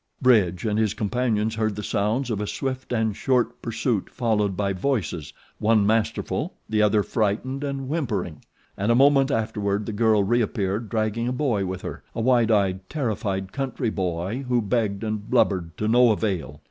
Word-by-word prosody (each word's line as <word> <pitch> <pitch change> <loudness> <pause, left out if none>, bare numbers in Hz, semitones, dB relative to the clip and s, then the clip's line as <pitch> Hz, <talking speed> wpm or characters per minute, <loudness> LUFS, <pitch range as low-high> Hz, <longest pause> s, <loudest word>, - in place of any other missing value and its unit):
Bridge 105 -9 +3
and 105 0 +1
his 110 -2 +1
companions 110 0 0
heard 110 -2 -1
the 105 - -5
sounds 110 +5 0
of 105 -2 -1
a 105 - -2
swift 130 +2 -4
and 110 -3 0
short 125 0 0
pursuit 115 -2 -1
followed 105 -5 0
by 100 -1 0
voices, 90 - -2 0.3
one 110 -1 +3
masterful, 110 +1 0
the 110 0 +1
other 105 0 +3
frightened 115 +7 -1
and 140 -2 -3
whimpering; 110 - -2 0.3
and 100 +4 0
a - - +4
moment 135 +1 +5
afterward 105 -4 -1
the 110 - -4
girl 110 -1 +3
reappeared 105 -1 0
dragging 110 +1 -1
a - - 0
boy 125 -8 0
with 95 0 -5
her - - -6
a - - -3
wide 120 -1 +3
eyed, 95 -3 +1
terrified, 105 -9 -2
country 130 -4 -2
boy 95 +6 -2
who 125 -1 +2
begged 105 -2 -1
and 110 -1 -3
blubbered 85 -3 +1
to 105 - -1
no 120 +2 +5
avail. 95 -9 -1
110 Hz, 170 wpm, -24 LUFS, 100-120 Hz, 0.3 s, moment